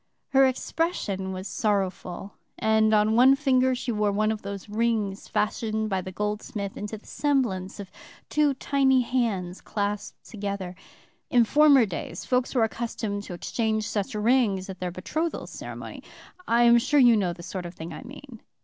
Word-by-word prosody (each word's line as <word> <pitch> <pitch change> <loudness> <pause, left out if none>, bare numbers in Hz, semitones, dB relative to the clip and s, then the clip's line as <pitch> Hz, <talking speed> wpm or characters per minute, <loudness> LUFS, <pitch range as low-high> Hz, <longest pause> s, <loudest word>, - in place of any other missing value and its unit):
Her 270 0 +5
expression 245 - -2
was 185 +1 -5
sorrowful, 195 -2 -2 0.2
and 220 0 +3
on 215 0 +3
one 260 +3 +7
finger 260 -2 +2
she 250 0 -3
wore 210 -2 +1
one 215 +2 +1
of 220 -1 -4
those 200 0 -7
rings 210 -2 -1
fashioned 215 0 -1
by 190 -1 0
the 185 - -7
goldsmith 210 0 -3
into 210 +1 -5
the 210 - -19
semblance 230 -11 -1
of 200 -2 -8 0.4
two 295 -2 +2
tiny 265 -1 +3
hands 220 -8 -1
clasped 205 -1 -4
together. 200 -4 -4 0.6
In 240 -2 +5
former 285 -1 +6
days 175 -3 -6
folks 250 +1 0
were 240 - +4
accustomed 225 -2 -3
to 180 - -6
exchange 220 +3 -1
such 210 +3 -2
rings 210 -4 +2
at 185 - -11
their 180 - -2
betrothal 310 - -3
ceremony. - - -8 0.5
I 235 +1 +4
am 235 0 +7
sure 290 +5 +2
you 240 -3 +7
know 190 -5 +1
the 170 0 -9
sort 180 0 -5
of 170 - -11
thing 165 +1 -7
I - - -8
mean. 265 -2 -11
215 Hz, 165 wpm, -26 LUFS, 195-250 Hz, 0.6 s, one